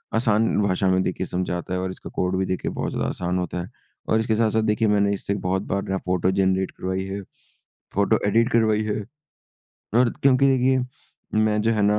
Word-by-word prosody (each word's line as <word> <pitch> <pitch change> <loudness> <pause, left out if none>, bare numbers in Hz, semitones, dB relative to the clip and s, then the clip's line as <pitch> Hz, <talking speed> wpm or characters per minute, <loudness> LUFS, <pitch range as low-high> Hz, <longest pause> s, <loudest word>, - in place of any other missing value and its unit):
आसान 110 -1 +3
भाषा 95 -1 +1
में 95 0 +3
देखिए 95 0 -2
समझाता 90 0 -3
है 90 - 0
और 95 0 -2
इसका - - -9
कोड 90 +1 0
भी 95 - 0
देखिए 95 -1 -2
बहुत - - -3
ज़्यादा - - -1
आसान 90 0 -2
होता 90 0 -3
है। 90 - -8 0.4
और 110 - +3
इसके 110 0 +1
साथ-साथ 110 0 +2
देखिए 110 +1 +1
मैंने 100 -1 +3
इससे 100 0 -2
बहुत 95 +1 +1
बार 100 +1 -1
ना 95 - 0
फोटो 90 0 +1
जेनरेट 95 0 +1
करवाई 95 +1 -3
है, 100 +1 -5 0.7
फोटो 100 +3 +3
एडिट 115 +3 +3
करवाई 110 -2 +3
है 105 0 -2 1.0
और 125 -1 +4
क्योंकि 135 0 +5 0.2
ये 130 0 +3 0.7
मैं 105 0 +1
जो 115 - +2
है 105 -2 +1
ना 105 +1 +3
100 Hz, 200 wpm, -23 LUFS, 95-110 Hz, 1.0 s, क्योंकि